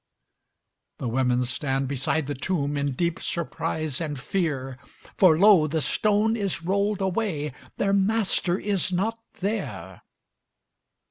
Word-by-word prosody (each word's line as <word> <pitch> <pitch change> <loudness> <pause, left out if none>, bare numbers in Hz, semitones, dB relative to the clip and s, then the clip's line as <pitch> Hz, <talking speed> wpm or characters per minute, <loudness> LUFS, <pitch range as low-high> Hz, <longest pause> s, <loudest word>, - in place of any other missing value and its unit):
The - - -4
women 125 +1 +1
stand 135 +1 -1
beside 140 +3 0
the 145 - -3
tomb 145 0 -1
In 140 -1 -1
deep 170 +4 -1
surprise 155 -3 -2
and 150 -4 -3
fear; 135 -6 -2 0.4
For 170 -5 +5
lo! 190 -4 +6
the 160 +2 -1
stone 210 +7 +2
is 200 -6 -2
rolled 200 +3 0
away 185 - -1 0.2
Their 195 0 +1
Master 195 -3 +2
is 200 -2 -1
not 215 +6 -1 0.2
there. 210 +4 -4
170 Hz, 125 wpm, -25 LUFS, 140-200 Hz, 0.4 s, lo